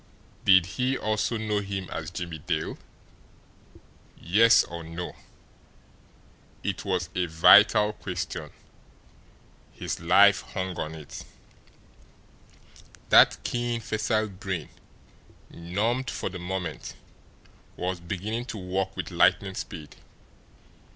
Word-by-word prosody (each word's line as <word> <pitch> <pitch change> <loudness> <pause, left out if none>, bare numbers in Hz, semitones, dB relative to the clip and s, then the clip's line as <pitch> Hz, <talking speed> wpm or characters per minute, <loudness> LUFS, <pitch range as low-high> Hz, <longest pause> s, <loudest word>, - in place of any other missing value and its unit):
Did 95 -3 +6
he 125 +8 -1
also 110 +2 -1
know 105 -1 -1
him 100 -2 -4
as 80 0 -4
Jimmie 85 -2 -6
Dale? 75 +1 -2 1.4
Yes, 110 +7 +5
or 85 0 -8
no? 85 +2 -6 1.5
It 100 -2 -3
was 90 -4 -1
a 90 -1 0
vital 105 +6 +6
question. 90 -5 -5 1.2
His - - -5
life 100 +4 +5
hung 95 -1 -5
on 80 +1 -4
it. 75 -2 -9 1.9
That - - +6
keen, 120 -1 -2
facile 110 -1 -1
brain, 95 -4 -5 0.8
numbed 110 +9 -2
for - - -3
the 90 0 -8
moment, 90 -2 -5 0.8
was 90 0 -2
beginning 100 +7 -4
to 115 - -6
work 95 0 -3
with - - -4
lightning 95 -1 +3
speed. 80 -5 -8
95 Hz, 105 wpm, -26 LUFS, 85-105 Hz, 1.9 s, Did